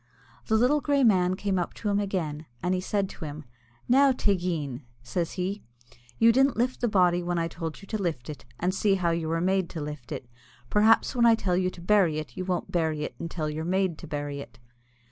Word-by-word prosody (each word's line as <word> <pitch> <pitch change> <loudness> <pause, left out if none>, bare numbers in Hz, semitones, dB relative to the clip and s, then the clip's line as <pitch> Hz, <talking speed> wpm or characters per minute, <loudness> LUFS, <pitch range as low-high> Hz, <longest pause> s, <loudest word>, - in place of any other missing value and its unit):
The 220 - +2
little 265 +6 +3
grey 285 -1 +2
man 185 -5 +4
came 190 -1 -1
up 175 - -3
to 210 - -3
him 200 0 +2
again, 160 -7 -3 0.2
and 180 +1 +1
said 200 +1 0
he - - -9
to 160 - -5
him, 150 +1 -7 0.4
"Now, 275 +2 +5
Teig_een_," 175 - -1 0.2
says 170 +7 -2
he, 195 +3 -3 0.6
"you 230 - +6
didn't 270 +2 +3
lift 250 +2 0
the 240 - +2
body 180 -4 +3
when 175 0 -2
I 165 0 0
told 165 +2 -6
you - - -9
to 215 -2 -2
lift 160 -10 -2
it, 150 - -7 0.2
and 180 +2 0
see 200 0 +2
how 175 -3 +1
you 165 -1 -1
were 165 +1 0
made 190 0 +1
to 165 - -6
lift 150 -4 -7
it; 125 - -5 0.4
perhaps 220 +4 +4
when 235 -1 +5
I 230 - +7
tell 185 -5 0
you 185 0 +1
to 180 - -12
bury 180 -4 +3
it 155 -1 -6
you 185 - -4
won't 180 -2 -2
bury 160 -3 0
it - - -4
until 165 -2 -3
you're 155 +1 -3
made 185 -1 0
to 170 - -9
bury 145 -1 -4
it!" 120 -4 -10
180 Hz, 225 wpm, -27 LUFS, 160-205 Hz, 0.6 s, I